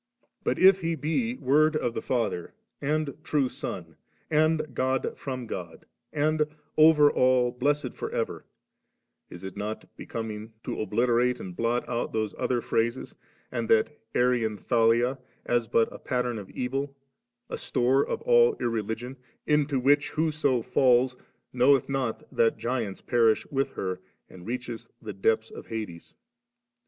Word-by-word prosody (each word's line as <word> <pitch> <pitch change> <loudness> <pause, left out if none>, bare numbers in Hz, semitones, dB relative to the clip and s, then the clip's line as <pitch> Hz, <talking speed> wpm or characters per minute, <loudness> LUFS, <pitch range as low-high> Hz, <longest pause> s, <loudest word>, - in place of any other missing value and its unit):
But - - 0
if 190 0 +6
He 165 -1 0
be 230 - -1
Word 155 - +3
of 120 -6 0
the - - -3
Father 110 -8 -2 0.3
and 150 0 0
true 145 -3 +1
Son, 90 - -7 0.3
and 155 -2 +2
God 130 +1 0
firom 130 -3 -5
God, 85 -6 -7 0.3
and 155 0 +1 0.3
*over 155 -2 +7
all 125 -1 +3
blessed 140 +1 0
for - - -5
ever - - -2 0.9
7/ - - -10
is 90 - -11
it 95 -1 -7
not 105 +2 -6
be - - -9
coming 110 -1 -5
to - - -3
obliterate 120 +3 +2
and 90 -2 -7
blot 115 +3 0
out 120 -1 -2
those 110 -2 -1
other 120 -2 0
phrases 115 +3 -1 0.4
and 120 -3 -3
that 115 +7 +3 0.2
Arian 120 -4 +2
Thalia, 120 +4 +2 0.3
as 120 -1 +1
but 115 +1 +3
a - - -9
pat 125 -1 -1
tern 120 -3 -2
of 100 - -10
evil, 135 +2 -3 0.5
a - - -5
store 130 +3 +2
of - - -4
all 475 -2 +5
irreligion, 115 +3 -3 0.3
mto 150 -2 +2
which, 145 +3 +3
whoso 150 -6 +1
falls, 125 0 +3 0.4
*knoweth 130 +1 +4
not 135 -4 -2
that 115 - +3
giants 115 -5 -3
perish 115 -2 +3
with 135 -1 0
her, 95 -1 -3 0.3
and 90 +1 -13
reacheth 120 -1 -5
the 110 -2 -7
depths 110 +3 +1
of - - -10
Hades 105 -7 -6
«? 235 - -55
125 Hz, 155 wpm, -27 LUFS, 115-145 Hz, 0.9 s, over